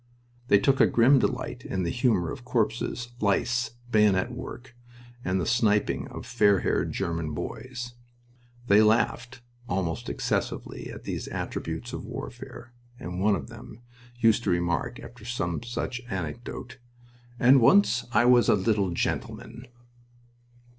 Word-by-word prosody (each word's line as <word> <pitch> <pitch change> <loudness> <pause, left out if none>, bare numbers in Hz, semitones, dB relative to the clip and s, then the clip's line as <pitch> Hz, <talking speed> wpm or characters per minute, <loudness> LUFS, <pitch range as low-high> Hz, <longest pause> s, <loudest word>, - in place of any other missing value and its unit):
They 100 - +6
took 135 +6 +3
a - - +7
grim 130 +4 +5
delight 125 0 -2
in 95 -1 -2
the 85 - -1
humor 120 -8 +1
of 130 - -8
corpses, 120 0 -1
lice, 120 +3 0 0.2
bayonet 105 0 +3
work, 125 0 -9 0.5
and 90 +1 0
the 90 - -1
sniping 105 -2 +1
of - - -8
fair 100 -3 +3
haired - - 0
German 80 -3 -3
boys. 120 +3 -6 0.7
They 105 -1 +6
laughed, 115 +3 +1 0.3
almost 90 -3 -2
excessively, - - -3
at - - -10
these - - -4
attributes - - -5
of - - -5
warfare, 120 0 -8 0.3
and 90 +1 -5
one 105 0 +4
of 70 -8 -6
them 115 +2 -12 0.4
used 115 0 +4
to - - +1
remark, 85 -3 0
after 120 -1 -12
some 110 -7 -2
such 120 +1 -4
anecdote, 120 - -6 0.6
"And 130 +1 +6
once 120 - +5
I 120 0 +4
was 120 -3 +5
a - - +6
little 100 -1 +1
gentleman!" 115 +7 -4
115 Hz, 140 wpm, -27 LUFS, 95-120 Hz, 0.7 s, a